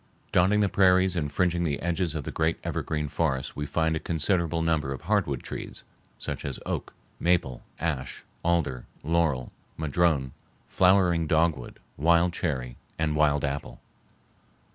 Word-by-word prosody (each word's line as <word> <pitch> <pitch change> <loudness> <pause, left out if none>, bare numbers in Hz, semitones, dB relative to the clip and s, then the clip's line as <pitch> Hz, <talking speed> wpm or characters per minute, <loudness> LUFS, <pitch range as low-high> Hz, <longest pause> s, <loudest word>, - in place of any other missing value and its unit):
Dotting 95 +4 +4
the 100 - +3
prairies 95 -1 +4
and 75 -4 -1
fringing 85 +2 +1
the 75 -4 -1
edges 85 -2 -1
of 75 - -3
the - - -5
great 80 +1 0
evergreen 75 -1 -2
forests 70 -3 -1
we 75 0 -3
find 80 +1 +1
a - - -1
considerable 85 0 0
number 80 -4 +1
of 65 - -5
hardwood - - 0
trees, - - -6 0.3
such - - -5
as - - -3
the - - -11
oak, - - -4 0.2
maple, 85 -8 +1 0.2
ash, 70 -7 -3 0.2
alder, 80 -7 0 0.2
laurel, 80 -6 +1 0.3
madrone, 80 -3 +1 0.4
flowering 90 -3 +3
dogwood, 80 -5 +1 0.2
wild 85 +3 +3
cherry, 65 -8 -3 0.2
and 80 -1 0
wild 75 -1 +3
apple. 70 -3 -4
80 Hz, 145 wpm, -27 LUFS, 70-85 Hz, 0.4 s, Dotting